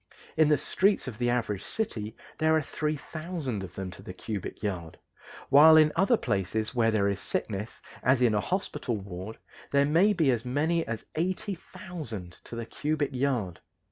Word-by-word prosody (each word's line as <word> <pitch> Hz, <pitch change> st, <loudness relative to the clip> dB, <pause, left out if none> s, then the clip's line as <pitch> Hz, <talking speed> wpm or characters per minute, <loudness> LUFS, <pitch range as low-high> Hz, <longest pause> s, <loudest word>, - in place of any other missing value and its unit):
In 155 Hz, -1 st, +4 dB
the 150 Hz, -, +5 dB
streets 195 Hz, -7 st, +2 dB
of 120 Hz, -2 st, -6 dB
the 120 Hz, 0 st, +1 dB
average 115 Hz, -5 st, 0 dB
city 110 Hz, -, -3 dB, 0.2 s
there 160 Hz, 0 st, +4 dB
are 160 Hz, -, +3 dB
3000 155 Hz, -, -3 dB
of 90 Hz, -2 st, -9 dB
them 95 Hz, -1 st, -5 dB
to 90 Hz, -, -10 dB
the 90 Hz, -, -9 dB
cubic 105 Hz, 0 st, -5 dB
yard, 90 Hz, -6 st, -3 dB, 0.5 s
while 155 Hz, +3 st, +9 dB
in 155 Hz, -1 st, +6 dB
other 210 Hz, +5 st, +4 dB
places 105 Hz, -, -1 dB
where 115 Hz, -2 st, +3 dB
there 105 Hz, -3 st, +2 dB
is 100 Hz, -1 st, -1 dB
sickness, 105 Hz, +2 st, -3 dB, 0.2 s
as 130 Hz, 0 st, +3 dB
in 120 Hz, -3 st, +4 dB
a 105 Hz, -, +2 dB
hospital 150 Hz, -, -2 dB
ward, 95 Hz, +2 st, -7 dB, 0.3 s
there 140 Hz, 0 st, +4 dB
may 170 Hz, +8 st, +4 dB
be 160 Hz, -8 st, +3 dB
as 115 Hz, -2 st, -1 dB
many 155 Hz, +7 st, +1 dB
as 110 Hz, -1 st, -4 dB
80,000 175 Hz, -, -4 dB
to -, -, -8 dB
the 115 Hz, 0 st, -4 dB
cubic 145 Hz, +3 st, -2 dB
yard. 125 Hz, -9 st, -1 dB
125 Hz, 175 wpm, -28 LUFS, 105-155 Hz, 0.5 s, while